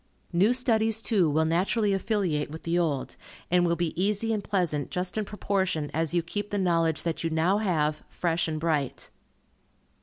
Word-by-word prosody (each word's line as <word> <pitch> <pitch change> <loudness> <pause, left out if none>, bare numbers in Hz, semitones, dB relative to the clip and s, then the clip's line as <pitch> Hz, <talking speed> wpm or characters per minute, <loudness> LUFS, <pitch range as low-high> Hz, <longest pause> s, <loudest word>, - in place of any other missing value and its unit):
New 190 +7 +4
studies, 225 -3 +2
too, 200 -8 +2
will 155 +2 +2
naturally 195 +6 +1
affiliate 190 -7 0
with 160 +2 -9
the 170 +1 +1
old, 150 -6 -1 0.4
and 175 -1 +4
will 170 - +2
be 170 -2 -1
easy 210 +2 0
and 210 -2 -2
pleasant 170 -8 -1
just 180 +1 -3
in 215 - 0
proportion 190 -7 -1
as 160 -1 0
you 175 -1 +1
keep 205 +4 -4
the 205 - -2
knowledge 165 -4 +1
that 165 -1 -2
you 165 - 0
now 165 +6 +2
have, 155 -7 0
fresh 170 -1 -1
and 155 -1 -3
bright. 155 -5 -1
175 Hz, 180 wpm, -27 LUFS, 160-205 Hz, 0.4 s, New